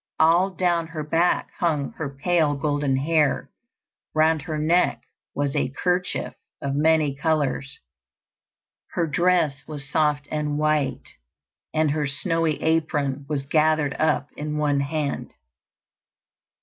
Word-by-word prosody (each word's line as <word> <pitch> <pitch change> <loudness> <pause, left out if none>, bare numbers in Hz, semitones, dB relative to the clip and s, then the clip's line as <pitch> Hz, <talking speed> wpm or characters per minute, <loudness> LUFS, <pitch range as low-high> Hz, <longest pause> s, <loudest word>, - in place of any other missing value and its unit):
All 170 +4 +5
down 175 -2 0
her 160 -2 -5
back 165 +4 +1
hung 155 -6 0
her 155 -3 -5
pale 150 +1 +1
golden 145 -1 0
hair; 150 0 +1 0.6
round 155 0 +3
her 155 -1 -4
neck 165 +4 +2 0.3
was 140 -1 -1
a - - +1
kerchief 180 +6 -1 0.3
of 140 0 -3
many 155 0 +3
colours; 145 -2 -1 1.2
her 170 - +1
dress 160 -3 +1
was 145 -3 -5
soft 150 -1 +1
and 150 -1 -1
white, 150 -2 0 0.6
and 155 -1 +1
her 150 -1 0
snowy 165 +2 0
apron 145 -4 0
was 140 -3 -2
gathered 155 -1 +2
up 150 -2 +1
in 150 0 -4
one 145 -2 +1
hand. 145 0 -3
150 Hz, 125 wpm, -24 LUFS, 145-160 Hz, 1.2 s, All